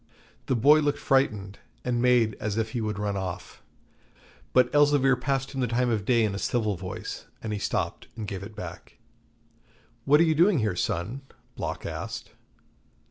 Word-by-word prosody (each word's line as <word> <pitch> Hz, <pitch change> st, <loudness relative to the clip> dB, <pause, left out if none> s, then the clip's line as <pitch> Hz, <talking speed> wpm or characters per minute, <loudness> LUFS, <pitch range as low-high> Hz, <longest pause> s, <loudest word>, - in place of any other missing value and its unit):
The 130 Hz, -, +2 dB
boy 145 Hz, +7 st, +6 dB
looked 145 Hz, -1 st, +1 dB
frightened, 105 Hz, -8 st, 0 dB, 0.3 s
and 120 Hz, -1 st, 0 dB
made 120 Hz, -3 st, +3 dB
as 105 Hz, 0 st, -2 dB
if 110 Hz, -1 st, -1 dB
he 120 Hz, -, -2 dB
would 105 Hz, -1 st, -2 dB
run 105 Hz, -1 st, -2 dB
off, 95 Hz, -2 st, -5 dB, 0.9 s
but 130 Hz, 0 st, +3 dB
Elzevir 145 Hz, -2 st, +5 dB
passed 135 Hz, +1 st, -2 dB
him 135 Hz, -, -3 dB
the 125 Hz, -, +1 dB
time 120 Hz, +1 st, +1 dB
of 105 Hz, -4 st, -1 dB
day 120 Hz, -1 st, +3 dB
in 105 Hz, -2 st, 0 dB
a 100 Hz, -, -4 dB
civil 110 Hz, -4 st, 0 dB
voice, 90 Hz, +1 st, -7 dB, 0.2 s
and 110 Hz, -1 st, -3 dB
he 105 Hz, -, -2 dB
stopped -, -, -2 dB
and 110 Hz, -3 st, -5 dB
gave 95 Hz, -2 st, -5 dB
it 105 Hz, +2 st, -9 dB
back. -, -, -9 dB, 1.1 s
'What 145 Hz, +2 st, +5 dB
are -, -, +6 dB
you 160 Hz, -1 st, +3 dB
doing 175 Hz, +4 st, +4 dB
here, 110 Hz, -6 st, 0 dB
son?' 100 Hz, +10 st, -2 dB, 0.3 s
Block -, -, -4 dB
asked. -, -, -5 dB
115 Hz, 180 wpm, -27 LUFS, 105-135 Hz, 1.1 s, boy